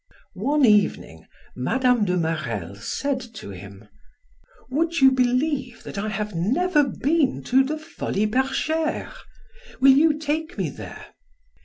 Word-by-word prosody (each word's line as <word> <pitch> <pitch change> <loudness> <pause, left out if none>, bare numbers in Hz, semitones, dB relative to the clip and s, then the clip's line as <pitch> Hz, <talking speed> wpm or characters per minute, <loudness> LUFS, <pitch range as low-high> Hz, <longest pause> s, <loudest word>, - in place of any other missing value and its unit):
One 275 +8 +2
evening, 200 - +1 0.3
Mme. 245 - +1
de 180 -1 0
Marelle 155 - -2
said 260 - -3 0.2
to 100 - -8
him: 100 +2 -11 0.8
"Would 330 +4 0
you 265 -1 +7
believe 255 0 0
that 200 - -6
I 215 +2 -2
have 210 0 -3
never 290 - +2
been 280 +1 0
to 265 +2 +3
the 300 +4 -3
Folies 305 -10 -2
Bergeres; 310 +5 -1 0.7
will 270 +1 +7
you 300 +1 +4
take 310 +1 -3
me - - -2
there?" - - -10
255 Hz, 130 wpm, -23 LUFS, 195-295 Hz, 0.8 s, you